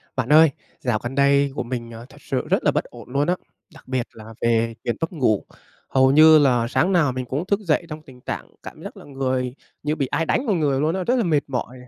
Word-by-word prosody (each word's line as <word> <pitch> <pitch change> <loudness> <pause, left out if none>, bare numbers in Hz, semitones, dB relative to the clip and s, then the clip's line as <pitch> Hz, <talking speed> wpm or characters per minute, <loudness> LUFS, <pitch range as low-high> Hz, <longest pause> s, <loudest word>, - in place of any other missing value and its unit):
Bạn 130 -2 -2
ơi, 160 0 +8 0.3
dạo 115 -4 -1
gần 120 +2 -5
đây 140 0 +3
của - - -2
mình, 120 -1 -5
ờ, 115 +1 -10
thật 145 +2 -17
sự 130 - -3
rất - - +1
là - - +3
bất - - 0
ổn - - -14
luôn 140 +4 0
á, 180 - +2 0.4
đặc 160 - -17
biệt 130 -2 -2
là 110 0 -12
về 115 0 +1
chuyện 120 - -1
mất 165 - -2
ngủ. 120 - +1 0.5
Hầu 130 0 +4
như 155 +2 +8
là 125 -5 +3
sáng 180 +8 +1
nào 165 -7 +3
mình 130 0 -4
cũng 140 +7 -3
thức 200 +2 +1
dậy 170 -4 0
trong 155 0 -7
tình 130 -5 -16
trạng - - -6
cảm - - -10
giác - - -9
là - - -12
người 130 -2 -2 0.3
như 150 +1 0
bị 140 - -1
ai 145 +5 -1
đánh 255 - 0
vào 205 - +2
người 145 -5 +1
luôn 155 +4 +1
á, 190 - -2
rất 245 +7 +1
là 245 - +1
mệt 160 -6 +2
mỏi 125 -2 -4
này, 125 0 -14
135 Hz, 265 wpm, -22 LUFS, 125-155 Hz, 0.5 s, ơi